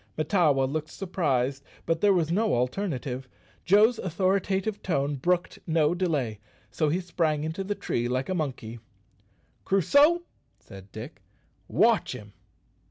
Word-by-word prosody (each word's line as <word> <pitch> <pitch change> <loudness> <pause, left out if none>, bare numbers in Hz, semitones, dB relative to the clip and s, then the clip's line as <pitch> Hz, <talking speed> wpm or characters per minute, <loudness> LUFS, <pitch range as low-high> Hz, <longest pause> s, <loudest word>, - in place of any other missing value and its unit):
Mahtawa 155 -4 +2
looked 155 +4 -2
surprised, 140 -9 -1 0.2
but 165 0 0
there 205 - +5
was 170 -4 +1
no 215 - +2
alternative. 130 -1 -2 0.4
Joe's 215 +5 +5
authoritative 190 +3 0
tone 145 -5 0
brooked 175 +6 -1
no 160 -1 +2
delay, 150 - -1 0.3
so 150 +5 0
he 170 +5 +1
sprang 165 -4 -1
into 160 +5 -3
the 205 +2 -3
tree 120 -9 -2
like 130 +2 -1
a 185 - -1
monkey. 125 -8 -4 0.8
"Crusoe," 285 - +4 0.4
said 95 0 -13
Dick, - - -9 0.5
"_watch - - +3
him! 105 -1 -10
160 Hz, 130 wpm, -27 LUFS, 135-190 Hz, 0.8 s, there